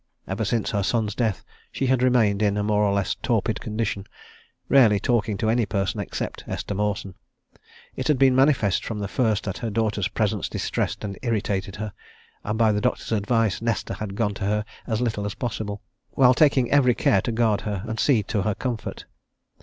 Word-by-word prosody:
Ever 100 +4 -2
since 110 +2 0
her 100 -3 0
son's 105 +1 0
death 110 -3 -1 0.3
she 135 - -2
had 130 -1 +2
remained 115 -5 +3
in 105 -1 +2
a 105 - 0
more 105 0 +2
or 105 -1 +3
less 100 +1 0
torpid 110 -2 -1
condition, 105 -3 -3 0.6
rarely 115 -7 +5
talking 110 -4 0
to 110 - -1
any 115 -1 +2
person 100 -1 -1
except - - -4
Esther - - -4
Mawson: 100 -1 -2 0.8
it 130 - -3
had 150 - +3
been 130 -1 +5
manifest 130 -8 +3
from 110 - -4
the 100 -1 -3
first 110 -1 0
that 95 +1 -4
her 115 -2 -3
daughter's 105 -3 0
presence - - -1
distressed - - -2
and 100 -2 -5
irritated 100 -5 -1
her, 105 -1 -5 0.5
and 105 +1 -2
by 110 -1 +4
the 105 0 0
doctor's - - -1
advice 110 -1 +1
Nesta 115 -1 -1
had 100 -2 -5
gone 105 -2 0
to 95 - -4
her 105 +1 0 0.2
as 110 0 -1
little 110 -4 -1
as 100 -1 -4
possible, 110 -4 -4 0.3
while 130 -2 +6
taking 135 -3 +3
every 125 -4 +4
care 95 - +3
to 120 - -2
guard 110 -2 +1
her 100 -3 -3
and 110 0 -4
see 125 -7 +3
to 100 0 -1
her 100 +1 0
comfort. 120 +1 -4
110 Hz, 195 wpm, -24 LUFS, 100-120 Hz, 0.8 s, while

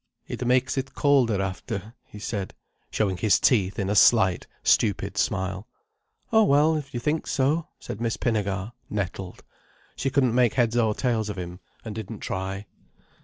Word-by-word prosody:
"It - - -4
makes 130 +2 +2
it 135 +1 -6
colder 130 -8 +3
after," 100 +2 -5
he - - -12
said, 105 -2 -4 0.3
showing 95 -4 0
his 105 +3 +3
teeth 100 -6 +2
in 100 -3 -1
a 100 - +1
slight, 95 -3 +4 0.2
stupid - - +2
smile. 95 +1 -1 0.7
"Oh 220 0 +6
well, 150 -1 +4
if 145 -2 -4
you - - -1
think 150 +5 -1
so," 150 +5 +1
said 105 - -7
Miss 115 -1 -1
Pinnegar, 100 -3 -1 0.2
nettled. 95 -2 -4 0.5
She 135 - -1
couldn't 130 -3 +2
make 125 -2 +3
heads 120 -2 +2
or 110 -3 +2
tails 115 -4 0
of 100 - -5
him, 90 0 -6 0.3
and 110 - -5
didn't 110 0 -7
try. 95 +2 -4
110 Hz, 165 wpm, -25 LUFS, 95-130 Hz, 0.7 s, Oh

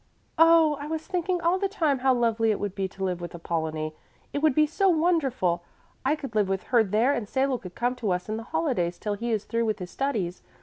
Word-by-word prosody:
"Oh, 325 -2 +6
I 290 - -5
was 320 0 -4
thinking 360 -1 -1
all 345 +3 +2
the 395 0 0
time 310 -9 +1
how 265 +1 +3
lovely 230 -2 +2
it 210 - +1
would 205 -2 -3
be 195 -1 -2
to 195 +1 -8
live 180 -2 -1
with 175 0 -6
Apollonie! 160 -2 -3 0.4
It 285 - -1
would 310 -4 +3
be 305 - +5
so 380 +6 +2
wonderful 285 - +1 0.4
I 280 +3 +2
could 275 -6 -8
live 210 -3 +2
with 190 -1 -1
her 235 -2 +6
there 220 +7 +2
and 230 -7 -3
Salo 265 -1 +1
could 180 -1 -10
come 245 +1 0
to 225 -5 -2
us 180 0 -1
in 215 +1 -2
the - - -5
holidays 250 - 0
till 210 - -3
he 230 +4 -3
is 215 -2 0
through 230 0 0
with 215 -1 0
his 180 -2 -7
studies. 210 -11 -2
235 Hz, 245 wpm, -26 LUFS, 195-305 Hz, 0.4 s, Oh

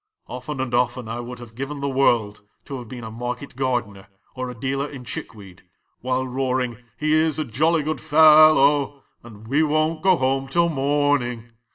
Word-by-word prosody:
"Often 130 +3 -7
and 130 -2 -4
often 120 0 0
I 115 +2 -4
would 120 +1 -7
have 120 -2 -12
given 135 +4 -5
the 140 - -2
world 120 -6 +1 0.2
to 135 -2 -6
have 120 - -10
been 120 0 -8
a 110 - -7
market 125 +4 -6
gardener 120 -7 -2 0.3
or 130 0 -5
a 125 - -8
dealer 135 +3 -2
in 135 -3 -9
chick 115 - -7
weed 95 -3 -14 0.4
while 130 +1 -1
roaring 125 -2 -2
' 110 - -40
He 155 +3 0
is 155 -1 +2
a 155 - -1
jolly 155 +7 +1
good 155 +2 -3
fellow,' 150 -2 +5 0.2
and 110 -2 -13
'We 140 +6 +2
won't 155 +1 +1
go 185 0 +4
home 135 0 0
till 170 +5 +2
morn 145 -1 +1
ing 120 -1 -7
130 Hz, 195 wpm, -22 LUFS, 120-145 Hz, 0.4 s, fellow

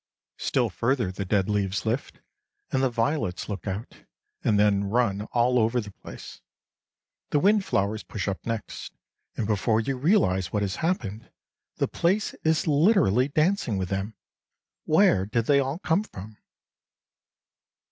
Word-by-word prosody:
Still - - 0
further 120 -5 0
the 95 +1 -5
dead 95 0 +1
leaves 100 -1 -1
lift, 115 +5 -3 0.5
and 130 - +1
the 135 - +3
violets 115 - -1
look 100 -2 -5
out, 100 +4 -5 0.5
and 105 - +3
then 100 -1 +3
run 105 -1 0
all 125 +1 +3
over 115 +2 +2
the 105 -3 -6
place. - - -11 0.9
The - - +2
wind 200 +6 +4
flowers 105 - 0
push 105 -3 -5
up 95 -1 -3
next, 115 -2 -5 0.4
and 110 - -1
before 110 +1 +1
you 135 +4 -1
realize 125 - +2
what 105 -1 0
has 95 -2 -2
happened, 115 - -2 0.5
the - - 0
place 195 +5 0
is 160 0 +2
literally 150 - +4
dancing 155 - +1
with 95 -2 -2
them. 100 +2 -3 0.7
Where 155 - +4
did 115 +1 0
they 140 +1 +4
all 135 +2 -1
come 180 +1 +1
from? 105 - -11
115 Hz, 145 wpm, -26 LUFS, 100-145 Hz, 0.9 s, wind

